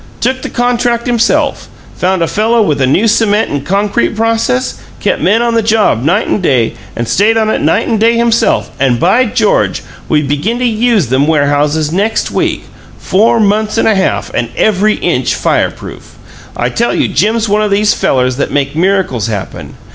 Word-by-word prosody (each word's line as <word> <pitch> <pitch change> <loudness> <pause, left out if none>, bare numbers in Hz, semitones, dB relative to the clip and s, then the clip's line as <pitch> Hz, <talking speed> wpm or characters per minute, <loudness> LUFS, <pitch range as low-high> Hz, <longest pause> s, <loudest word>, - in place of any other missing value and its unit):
Took 260 +2 -1
the - - -5
contract 240 -1 -1
himself; 240 -1 0 0.3
found 185 -1 0
a - - 0
fellow 225 +4 +1
with 150 -8 -1
a 130 - +2
new 190 - +2
cement 215 -1 +1
and 145 -1 -3
concrete 200 +7 -1
process; 225 - -1 0.2
kept - - -1
men 220 +6 +2
on 235 -1 0
the 230 - +2
job 215 - +1
night 175 +9 +1
and 210 - -1
day, 125 -9 +1 0.2
and 120 0 -3
stayed 220 - +2
on 220 -1 +1
it - - -1
night - - +1
and 225 - 0
day 230 +1 +3
himself 235 -1 +1
and, 130 -3 +1
by 255 - +3
George! 225 -2 0 0.3
we 150 -1 +2
begin 145 - -2
to 250 - -1
USE 230 -5 +1
them 135 +3 +1
warehouses 150 0 +1
next 205 +6 -1
week! - - -1 0.3
Four 220 +5 +1
months 215 +1 0
and - - +2
a 220 - +4
half, 190 -1 -1
and 120 - -2
every 215 0 +2
inch - - -1
fireproof! - - -3 0.4
I - - -1
tell 235 - -1
you - - +1
Jim's 220 +2 0
one 210 +1 +1
o' 210 - 0
these 205 +1 +2
fellers 125 -1 0
that 140 - -1
make 140 0 -2
miracles 175 - 0
happen! 105 -4 -6
210 Hz, 185 wpm, -12 LUFS, 150-225 Hz, 0.4 s, a